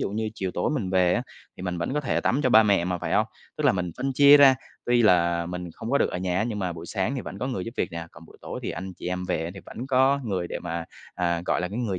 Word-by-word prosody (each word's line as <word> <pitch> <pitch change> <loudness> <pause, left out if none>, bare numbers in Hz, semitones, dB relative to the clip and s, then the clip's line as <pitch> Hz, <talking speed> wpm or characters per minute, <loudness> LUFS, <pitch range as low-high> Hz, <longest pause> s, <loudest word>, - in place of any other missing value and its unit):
dụ - - -1
như 110 +1 -2
chiều 95 -4 -3
tối - - 0
mình 110 -11 -2
về 90 -1 +3
á, - - 0 0.3
thì - - -9
mình 90 -2 -3
vẫn 110 +11 -2
có 150 - +1
thể 135 - 0
tắm 135 - +1
cho 130 - +2
ba 110 -2 +8
mẹ 100 -5 +3
mà, 90 -1 -2
phải - - -4
hông? - - +3 0.3
Tức - - -3
là - - +5
mình 90 -2 -2
phân 135 0 -2
chia 140 +2 +8
ra. 140 -2 +8 0.3
Tuy 120 -1 +4
là 85 -4 +3
mình 90 -1 -5
không 115 - -6
có 140 - +3
được - - +1
ở 90 - -3
nhà 90 0 -1
á, 105 - +1
nhưng 110 -3 -3
mà 90 -3 -2
buổi 85 +1 -9
sáng 110 +8 -1
thì 130 - -3
vẫn 95 - -8
có 125 - -2
người 95 -9 -3
giúp 115 - -6
việc 95 - -1
nè, 85 0 -5
còn 85 - -14
buổi - - -17
tối - - -6
thì - - -3
anh 95 +2 -6
chị - - -9
em 90 0 -3
về 85 -3 -1
á, 85 - -4
thì 95 - -9
vẫn 125 +4 -7
có 135 +1 +3
người 95 -5 -2
để - - -4
mà 85 0 -4 0.3
à, 85 -1 0
gọi - - +1
là, 90 - -2
cái 105 +5 -5
người 100 -7 -1
95 Hz, 325 wpm, -25 LUFS, 90-120 Hz, 0.3 s, ba